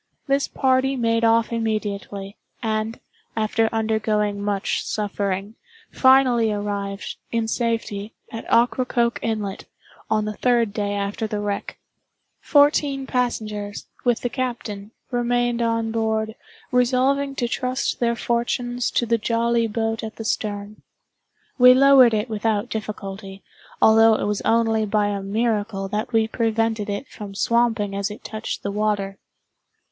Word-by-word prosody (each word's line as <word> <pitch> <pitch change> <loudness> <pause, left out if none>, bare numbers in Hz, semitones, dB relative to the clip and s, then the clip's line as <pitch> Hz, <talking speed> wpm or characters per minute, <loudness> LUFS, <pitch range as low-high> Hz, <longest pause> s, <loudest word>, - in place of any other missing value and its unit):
This 275 0 +1
party 265 +1 +1
made 230 -2 +1
off 230 0 +3
immediately, 205 -3 -3 0.3
and, 220 0 -2 0.4
after 220 0 +1
undergoing 215 -2 0
much 205 -1 -1
suffering, 200 -1 -2 0.4
finally 255 -4 +4
arrived, 200 -1 -4
in 230 -1 0
safety, 225 -3 -2 0.2
at 225 - -7
Ocracoke 240 0 +2
Inlet, 215 -4 -3 0.4
on 215 -1 +1
the 215 - -3
third 235 -2 +1
day 205 -1 -1
after 200 +2 -2
the 210 -1 -3
wreck. 205 -1 -3 0.6
Fourteen 285 -2 +3
passengers, 215 -5 -2 0.2
with 240 -2 +1
the 245 - -1
captain, 235 -6 -4 0.2
remained 240 0 +1
on 230 -1 0
board, 220 -1 -1 0.4
resolving 265 +3 +2
to 245 -3 -1
trust 255 +2 -2
their 235 -1 +1
fortunes 240 +1 -1
to 240 - +1
the 230 0 +1
jolly 230 +1 +1
boat 225 0 -2
at 220 0 -6
the 225 - -7
stern. 205 -1 -3 0.8
We 250 0 +9
lowered 260 -3 +7
it 210 +2 -1
without 220 0 -1
difficulty, 195 -2 -6 0.4
although 225 0 +6
it - - -2
was 205 0 -1
only 225 -1 +2
by 205 0 +1
a 200 -1 -2
miracle 205 -1 -1
that 210 +3 -3
we 225 -2 +3
prevented 225 -2 0
it 205 +7 -3
from 200 -2 -9
swamping 225 -3 +1
as 200 +1 -1
it 210 - -10
touched 220 0 -5
the 200 - -2
water. 200 -2 -1
225 Hz, 135 wpm, -23 LUFS, 210-235 Hz, 0.8 s, We